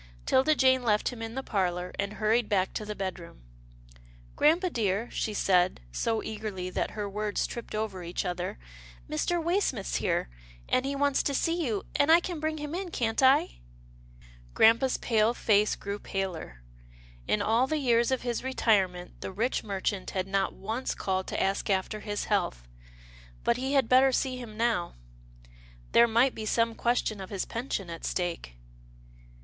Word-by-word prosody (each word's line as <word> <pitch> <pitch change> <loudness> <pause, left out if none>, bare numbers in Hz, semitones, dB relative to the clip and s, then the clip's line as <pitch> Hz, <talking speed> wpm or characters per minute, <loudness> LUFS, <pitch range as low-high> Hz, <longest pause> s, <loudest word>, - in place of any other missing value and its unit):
'Tilda 270 +4 +4
Jane 260 -1 +4
left 210 -3 +1
him 245 -3 -8
in 225 +1 -5
the 265 - -3
parlour, 180 -4 -1
and 200 +1 -1
hurried 220 +2 +1
back 190 -2 +1
to 215 - -4
the 210 0 -5
bedroom. 180 - -6 0.5
" - - -24
Grampa 340 +5 +3
dear," 215 -1 -1
she 220 - -2
said, 185 -3 +2
so 225 - -1
eagerly 210 -4 -5
that - - -3
her 205 -1 -2
words 210 +1 -2
tripped 235 -2 -6
over 215 -4 -3
each 175 +2 -3
other, 180 0 -3 0.5
Mr. 345 - 0
Waysmith's 335 - 0
here, - - 0 0.4
and 255 +1 +1
he 280 - -2
wants 280 0 +2
to 280 - -1
see 335 +4 0
you, 215 -4 -1
and 285 +2 +4
I 335 - +8
can 345 -2 -5
bring 310 0 -2
him 295 0 -5
in, 370 +1 -3
can't 225 -7 -1
I? 260 - +4 0.4
" - - -23
Grampa's 230 +4 +5
pale 225 0 +2
face 210 -2 +3
grew 200 +1 -5
paler. 175 - -5 0.6
In 105 - +2
all 230 +4 +2
the 310 - 0
years 240 -4 +2
of 260 -1 -1
his 240 -1 -2
retirement 195 -9 0
the - - -5
rich 225 +7 -1
merchant 195 -1 -2
had 185 -1 -2
not 195 0 -1
once 225 +6 -3
called 190 -1 -2
to - - -3
ask 195 +2 0
after 195 +2 0
his 205 -1 -3
health - - -1 0.4
— - - -22
but 235 - +2
he 265 +2 -2
had 270 -5 +3
better 260 +2 +5
see 255 0 0
him 225 -4 -9
now. 225 -7 0 1.0
There 235 - +6
might 235 +4 +3
be 215 -1 -5
some 230 +1 +2
question 225 -3 0
of 190 - -8
his 195 -3 -3
pension 225 -7 -4
at 165 - -8
stake. 170 - -3
215 Hz, 175 wpm, -28 LUFS, 185-255 Hz, 1.0 s, I